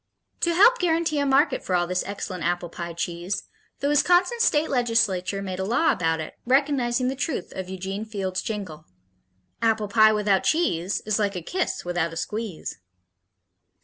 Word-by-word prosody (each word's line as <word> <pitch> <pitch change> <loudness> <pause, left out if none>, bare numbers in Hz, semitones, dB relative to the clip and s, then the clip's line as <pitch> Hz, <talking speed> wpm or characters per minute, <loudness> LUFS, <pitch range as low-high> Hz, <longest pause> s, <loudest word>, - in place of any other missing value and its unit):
To 340 -1 +1
help 485 +7 +6
guarantee 330 -3 +1
a 285 - +1
market 270 0 +3
for 185 - 0
all 175 0 +2
this 180 +1 -1
excellent 195 -2 -5
apple 175 0 -1
pie 170 0 -6
cheese, 175 +3 -3 0.4
the 280 - +1
Wisconsin 355 - +3
State 315 -9 +2
Legislature 215 -6 +1
made 185 -1 -5
a - - -1
law 245 +11 +2
about 160 -2 0
it, 155 - -6
recognizing 255 -2 +1
the 265 - -1
truth 270 - -3
of 185 -1 -5
Eugene 190 +2 -4
Field's 195 -4 -3
jingle: 185 -8 -6 0.8
Apple 220 -2 +1
pie 215 0 +6
without 210 -3 +2
cheese 195 - +1
Is 215 0 0
like 200 -2 0
a 180 - -3
kiss 365 - -2
without 175 -2 -1
a - - -7
squeeze. 210 - -5
210 Hz, 170 wpm, -25 LUFS, 180-270 Hz, 0.8 s, help